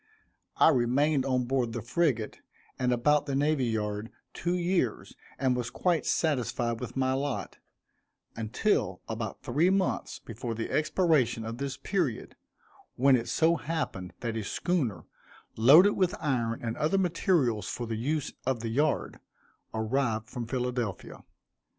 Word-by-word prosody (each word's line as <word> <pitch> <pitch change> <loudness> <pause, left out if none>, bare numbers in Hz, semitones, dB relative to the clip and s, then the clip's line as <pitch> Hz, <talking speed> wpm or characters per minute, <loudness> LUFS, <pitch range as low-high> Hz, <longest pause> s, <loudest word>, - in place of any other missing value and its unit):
I - - +7
remained 135 +1 +2
on 130 -1 +1
board 125 -2 0
the 120 - -3
frigate, 120 -5 0 0.4
and 125 -1 +1
about 150 +5 +2
the 140 - -1
Navy 145 -1 +2
Yard, 105 -1 -2 0.2
two 175 +1 -1
years, 175 - -1 0.2
and 130 -2 +1
was 125 -1 -2
quite 175 +4 0
satisfied 120 -6 0
with 125 +1 -6
my 130 0 +2
lot, 140 0 -3 0.8
until 110 - 0
about 110 -2 -5
three 150 +9 +2
months 190 -1 0
before 115 +1 -6
the 115 - -4
expiration 155 -8 +2
of 115 +2 -5
this 140 -1 -3
period, 145 - -2 0.6
when 135 +1 +5
it 120 -2 -1
so 165 +1 +3
happened 145 - -4
that 115 -2 -2
a 110 - -2
schooner, 130 - -1 0.5
loaded 150 - +7
with 185 -2 +1
iron 120 -7 -1
and 115 -1 -3
other 160 +6 +1
materials 160 - +1
for 120 - -4
the 115 - -4
use 145 +6 -2
of 130 -3 -1
the 115 - -3
yard, 145 +6 0 0.5
arrived 110 -1 -1
from 120 -2 -5
Philadelphia. 125 -5 -3
130 Hz, 145 wpm, -29 LUFS, 115-155 Hz, 0.8 s, I